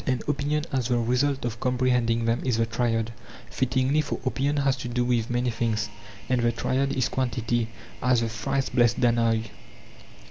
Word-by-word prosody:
And 130 Hz, -2 st, 0 dB
opinion 150 Hz, +1 st, 0 dB
as 130 Hz, -4 st, 0 dB
the 125 Hz, -1 st, +2 dB
result 125 Hz, +3 st, +1 dB
of 115 Hz, -1 st, -3 dB
comprehending 125 Hz, -2 st, +1 dB
them 115 Hz, +2 st, +1 dB
is 125 Hz, -3 st, +1 dB
the 115 Hz, -, +2 dB
triad; 115 Hz, -1 st, -1 dB, 0.4 s
fittingly, 130 Hz, +3 st, +1 dB
for 145 Hz, -, -4 dB
opinion 140 Hz, +3 st, 0 dB
has 135 Hz, -2 st, +2 dB
to 125 Hz, -, -5 dB
do 120 Hz, 0 st, 0 dB
with 120 Hz, -2 st, +1 dB
many 120 Hz, 0 st, 0 dB
things; 110 Hz, -2 st, -1 dB, 0.4 s
and 125 Hz, -1 st, +1 dB
the 120 Hz, 0 st, +3 dB
triad 130 Hz, +4 st, 0 dB
is 130 Hz, -3 st, +1 dB
quantity, 120 Hz, -3 st, -1 dB, 0.3 s
as 125 Hz, -1 st, +3 dB
'The 115 Hz, -, -1 dB
thrice 130 Hz, +4 st, -1 dB
blessed 120 Hz, -1 st, +3 dB
Danaoi. 115 Hz, -2 st, +2 dB
120 Hz, 175 wpm, -26 LUFS, 115-130 Hz, 0.4 s, the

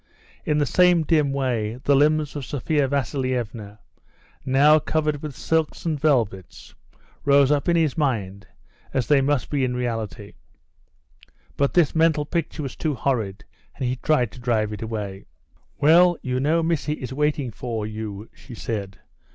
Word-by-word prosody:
In 150 Hz, -, +1 dB
the 145 Hz, -, +2 dB
same 180 Hz, +2 st, +4 dB
dim 150 Hz, -3 st, +2 dB
way 120 Hz, -5 st, -1 dB
the 140 Hz, -, +3 dB
limbs 150 Hz, +1 st, +2 dB
of 145 Hz, -, -4 dB
Sophia 145 Hz, +2 st, 0 dB
Vasilievna, 125 Hz, -6 st, -3 dB, 0.7 s
now 145 Hz, +4 st, +5 dB
covered 150 Hz, -1 st, -1 dB
with 150 Hz, -4 st, -6 dB
silks 160 Hz, +3 st, -1 dB
and 155 Hz, -3 st, -1 dB
velvets, 115 Hz, -, -1 dB, 0.5 s
rose 140 Hz, 0 st, +4 dB
up 145 Hz, +2 st, +1 dB
in 170 Hz, -, +3 dB
his 160 Hz, -5 st, +1 dB
mind 105 Hz, -, -2 dB, 0.5 s
as 130 Hz, -3 st, +1 dB
they 145 Hz, -2 st, +4 dB
must 140 Hz, -1 st, 0 dB
be 140 Hz, -3 st, 0 dB
in 125 Hz, -1 st, -1 dB
reality; 115 Hz, -4 st, -4 dB, 1.2 s
but 140 Hz, 0 st, 0 dB
this 175 Hz, -5 st, +4 dB
mental 160 Hz, -2 st, +2 dB
picture 160 Hz, -1 st, -3 dB
was 135 Hz, -4 st, -6 dB
too 155 Hz, -3 st, -2 dB
horrid 110 Hz, -6 st, -2 dB, 0.3 s
and 130 Hz, -, -3 dB
he 125 Hz, -, -1 dB
tried 130 Hz, -3 st, +1 dB
to -, -, -13 dB
drive 110 Hz, -3 st, 0 dB
it 105 Hz, -, -7 dB
away. 105 Hz, -4 st, -5 dB, 0.5 s
"Well, 170 Hz, +4 st, +5 dB
you 125 Hz, 0 st, -1 dB
know 160 Hz, +5 st, +1 dB
Missy 160 Hz, -2 st, 0 dB
is 130 Hz, -4 st, -6 dB
waiting 150 Hz, -2 st, 0 dB
for 115 Hz, -1 st, -4 dB
you," 105 Hz, -1 st, -6 dB
she 125 Hz, -, -12 dB
said. 100 Hz, -4 st, -5 dB
135 Hz, 160 wpm, -23 LUFS, 115-150 Hz, 1.2 s, now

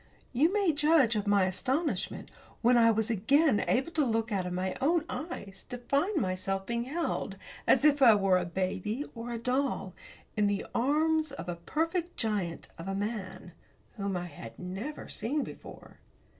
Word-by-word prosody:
You 295 Hz, +8 st, +4 dB
may 400 Hz, -4 st, +3 dB
judge 295 Hz, -5 st, +4 dB
of 210 Hz, -1 st, -1 dB
my 200 Hz, -1 st, +4 dB
astonishment 260 Hz, -, -1 dB, 0.3 s
when 245 Hz, +2 st, +5 dB
I 230 Hz, -1 st, +6 dB
was 220 Hz, 0 st, +1 dB
again 230 Hz, -, +3 dB
able 270 Hz, +7 st, +1 dB
to 315 Hz, -3 st, +2 dB
look 225 Hz, -2 st, 0 dB
out 190 Hz, -3 st, 0 dB
of 180 Hz, -, -4 dB
my 185 Hz, +1 st, -2 dB
own 315 Hz, +3 st, +2 dB
eyes, 300 Hz, -, -6 dB
to 245 Hz, -, -6 dB
find 285 Hz, -, 0 dB
myself 195 Hz, 0 st, -1 dB
being 235 Hz, +1 st, -2 dB
held, 325 Hz, +6 st, -2 dB, 0.3 s
as -, -, +5 dB
if 290 Hz, -1 st, +5 dB
I 235 Hz, -5 st, +8 dB
were 195 Hz, -2 st, +3 dB
a 180 Hz, -, -2 dB
baby, 190 Hz, -, -2 dB
or 230 Hz, 0 st, -6 dB
a 235 Hz, -, -2 dB
doll, 250 Hz, -5 st, -1 dB, 0.4 s
in 210 Hz, -1 st, +3 dB
the 200 Hz, -1 st, -1 dB
arms 310 Hz, +4 st, +2 dB
of 275 Hz, -, -7 dB
a 175 Hz, -, -2 dB
perfect 330 Hz, -, -2 dB
giant 200 Hz, -7 st, -2 dB
of 165 Hz, -, -7 dB
a 195 Hz, -, -2 dB
man, 200 Hz, -3 st, -4 dB, 0.4 s
whom 200 Hz, -3 st, -2 dB
I 175 Hz, -, -4 dB
had 145 Hz, -9 st, -10 dB
never 190 Hz, +11 st, -6 dB
seen 280 Hz, +5 st, -1 dB
before. -, -, -11 dB
230 Hz, 175 wpm, -30 LUFS, 195-290 Hz, 0.4 s, I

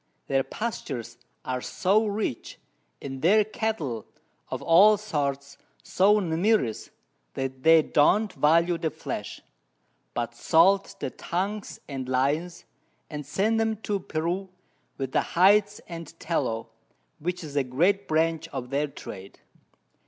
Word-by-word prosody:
Their 135 Hz, -1 st, +1 dB
Pastures 135 Hz, -, -5 dB, 0.3 s
are 130 Hz, -1 st, -2 dB
so 210 Hz, -, +1 dB
rich, 205 Hz, -, -3 dB, 0.5 s
and 135 Hz, -1 st, -6 dB
their 210 Hz, +6 st, +5 dB
Cattle 185 Hz, -, -3 dB, 0.4 s
of -, -, -4 dB
all 205 Hz, +6 st, +6 dB
sorts 140 Hz, -8 st, -3 dB, 0.2 s
so 205 Hz, +3 st, +3 dB
numerous, 170 Hz, -, 0 dB, 0.5 s
that 130 Hz, 0 st, -4 dB
they 160 Hz, +1 st, +6 dB
don't 195 Hz, +9 st, +3 dB
value 165 Hz, +3 st, +3 dB
the 160 Hz, -, 0 dB
Flesh, -, -, -6 dB, 0.7 s
but 120 Hz, 0 st, -2 dB
salt 185 Hz, +10 st, +3 dB
the -, -, -3 dB
Tongues 195 Hz, +4 st, -4 dB
and 130 Hz, -3 st, -5 dB
Loins, 145 Hz, +7 st, 0 dB, 0.5 s
and 150 Hz, -1 st, -5 dB
send 215 Hz, +9 st, +1 dB
'em 220 Hz, -1 st, 0 dB
to 205 Hz, -1 st, -1 dB
Peru 175 Hz, +3 st, -3 dB, 0.5 s
with 135 Hz, -2 st, -3 dB
the -, -, +2 dB, 0.2 s
Hides 205 Hz, +3 st, +5 dB
and 165 Hz, -1 st, -9 dB
Tallow, 125 Hz, -9 st, -2 dB, 0.5 s
which 180 Hz, +3 st, -3 dB
is 145 Hz, -2 st, -8 dB
a 140 Hz, -, +3 dB
great 175 Hz, +11 st, +1 dB
Branch 160 Hz, +1 st, +1 dB
of 130 Hz, -4 st, -6 dB
their 145 Hz, +2 st, +1 dB
Trade. 95 Hz, -8 st, -10 dB
165 Hz, 130 wpm, -26 LUFS, 140-200 Hz, 0.7 s, all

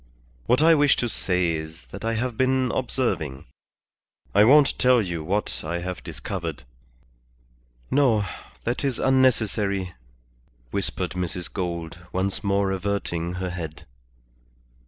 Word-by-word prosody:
What 125 Hz, +5 st, +4 dB
I 165 Hz, +1 st, +7 dB
wish 145 Hz, -3 st, +5 dB
to 120 Hz, -, -1 dB
say 90 Hz, -5 st, 0 dB
is 80 Hz, +1 st, -6 dB
that 100 Hz, -, -8 dB
I 115 Hz, 0 st, 0 dB
have 120 Hz, +1 st, -2 dB
been 130 Hz, 0 st, +2 dB
observing. 90 Hz, -, -1 dB, 0.9 s
I 105 Hz, -, +6 dB
won't 140 Hz, +5 st, +6 dB
tell 125 Hz, -1 st, +5 dB
you 85 Hz, -6 st, -2 dB
what 100 Hz, +6 st, -2 dB
I 85 Hz, +2 st, -2 dB
have 90 Hz, 0 st, -5 dB
discovered -, -, -5 dB, 0.7 s
" -, -, -35 dB
"No. 110 Hz, -7 st, +3 dB, 0.4 s
That 120 Hz, +4 st, -2 dB
is 135 Hz, -4 st, 0 dB
unnecessary," 110 Hz, -8 st, +2 dB, 0.8 s
whispered 95 Hz, -2 st, -1 dB
Mrs. 90 Hz, -1 st, -3 dB
Gould, 85 Hz, -3 st, -4 dB
once 95 Hz, +3 st, -1 dB
more 100 Hz, -1 st, +1 dB
averting 95 Hz, -3 st, -2 dB
her 90 Hz, 0 st, -3 dB
head. 80 Hz, -4 st, -6 dB
95 Hz, 130 wpm, -25 LUFS, 85-120 Hz, 0.9 s, I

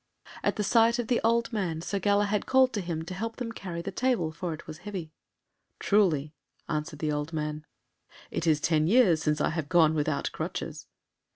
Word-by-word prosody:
At -, -, 0 dB
the 210 Hz, -, -1 dB
sight 230 Hz, +3 st, +4 dB
of 240 Hz, -2 st, -3 dB
the 245 Hz, -, +2 dB
old 230 Hz, +1 st, +2 dB
man 170 Hz, -6 st, -2 dB
Sir 200 Hz, +3 st, -2 dB
Galahad 205 Hz, +1 st, +1 dB
called 260 Hz, 0 st, +4 dB
to 205 Hz, -, -1 dB
him 165 Hz, -3 st, -4 dB
to 185 Hz, -, -6 dB
help 225 Hz, +4 st, -4 dB
them 245 Hz, -2 st, -4 dB
carry 175 Hz, -6 st, -6 dB
the 195 Hz, -, -4 dB
table, 225 Hz, -7 st, 0 dB
for 170 Hz, +2 st, -4 dB
it 155 Hz, -, -7 dB
was 155 Hz, 0 st, -9 dB
heavy. 190 Hz, -7 st, -6 dB, 0.7 s
"Truly," 160 Hz, -8 st, +2 dB, 0.3 s
answered 150 Hz, -1 st, -3 dB
the 150 Hz, 0 st, -1 dB
old 150 Hz, +2 st, -3 dB
man, 150 Hz, 0 st, -3 dB, 0.6 s
"it 165 Hz, -, -2 dB
is 155 Hz, -2 st, +4 dB
ten 155 Hz, -1 st, +2 dB
years 190 Hz, -7 st, +5 dB
since 150 Hz, -1 st, +1 dB
I -, -, +2 dB
have 160 Hz, -3 st, -3 dB
gone 165 Hz, -3 st, +5 dB
without 150 Hz, -1 st, -1 dB
crutches." -, -, -5 dB
175 Hz, 195 wpm, -28 LUFS, 155-210 Hz, 0.7 s, years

